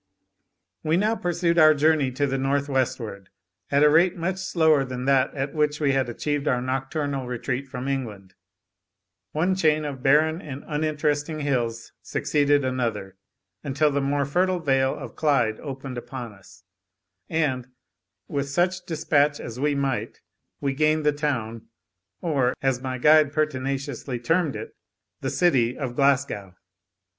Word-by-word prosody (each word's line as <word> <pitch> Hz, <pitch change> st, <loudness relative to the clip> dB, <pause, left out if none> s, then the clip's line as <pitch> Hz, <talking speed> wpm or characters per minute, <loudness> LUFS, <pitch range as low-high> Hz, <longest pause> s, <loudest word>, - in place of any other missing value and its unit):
We 160 Hz, +1 st, +2 dB
now 215 Hz, +4 st, +2 dB
pursued 175 Hz, -3 st, 0 dB
our 155 Hz, -1 st, +7 dB
journey 150 Hz, -2 st, +3 dB
to 145 Hz, +3 st, 0 dB
the 135 Hz, -1 st, -1 dB
north 140 Hz, +1 st, 0 dB
westward, 115 Hz, -7 st, -2 dB, 0.4 s
at 140 Hz, +1 st, +3 dB
a 150 Hz, -, +7 dB
rate 175 Hz, +4 st, +4 dB
much 180 Hz, +3 st, -2 dB
slower 160 Hz, -6 st, +3 dB
than 130 Hz, -1 st, -5 dB
that 135 Hz, -1 st, +3 dB
at 135 Hz, 0 st, -3 dB
which 150 Hz, -1 st, 0 dB
we 145 Hz, -3 st, +2 dB
had 135 Hz, -2 st, +1 dB
achieved 145 Hz, +4 st, -2 dB
our 125 Hz, -, +2 dB
nocturnal 135 Hz, +1 st, -2 dB
retreat 125 Hz, +2 st, -3 dB
from 130 Hz, 0 st, -6 dB
England. 105 Hz, -9 st, -4 dB, 1.0 s
One 175 Hz, +5 st, +1 dB
chain 155 Hz, -4 st, +2 dB
of 140 Hz, -3 st, -5 dB
barren 155 Hz, +5 st, +3 dB
and 140 Hz, -4 st, -8 dB
uninteresting 150 Hz, 0 st, -1 dB
hills 120 Hz, -5 st, -2 dB
succeeded 145 Hz, -1 st, +1 dB
another, 115 Hz, -7 st, -2 dB, 0.5 s
until 145 Hz, +2 st, +1 dB
the 140 Hz, 0 st, 0 dB
more 140 Hz, +1 st, 0 dB
fertile 180 Hz, +6 st, +1 dB
vale 135 Hz, -5 st, +1 dB
of -, -, -9 dB
Clyde 135 Hz, -8 st, +1 dB
opened 135 Hz, -3 st, -6 dB
upon 120 Hz, -3 st, -7 dB
us; 95 Hz, -2 st, -18 dB, 0.7 s
and, 140 Hz, -6 st, 0 dB, 0.6 s
with 140 Hz, -1 st, -2 dB
such 180 Hz, +5 st, 0 dB
despatch 150 Hz, -3 st, +1 dB
as 120 Hz, +1 st, -7 dB
we 145 Hz, +1 st, +1 dB
might, 135 Hz, -2 st, -2 dB, 0.4 s
we 140 Hz, -1 st, -1 dB
gained 155 Hz, +2 st, +1 dB
the 150 Hz, -, +5 dB
town, 125 Hz, -7 st, -3 dB, 0.5 s
or, 135 Hz, -7 st, +1 dB
as 135 Hz, -2 st, +1 dB
my 130 Hz, -1 st, -3 dB
guide 150 Hz, +2 st, +5 dB
pertinaciously 135 Hz, -3 st, -2 dB
termed 160 Hz, +5 st, 0 dB
it, -, -, -7 dB, 0.4 s
the -, -, -3 dB
city, 130 Hz, -9 st, +2 dB
of 130 Hz, -4 st, -4 dB
Glasgow. 135 Hz, -9 st, +1 dB
140 Hz, 150 wpm, -25 LUFS, 130-155 Hz, 1.0 s, our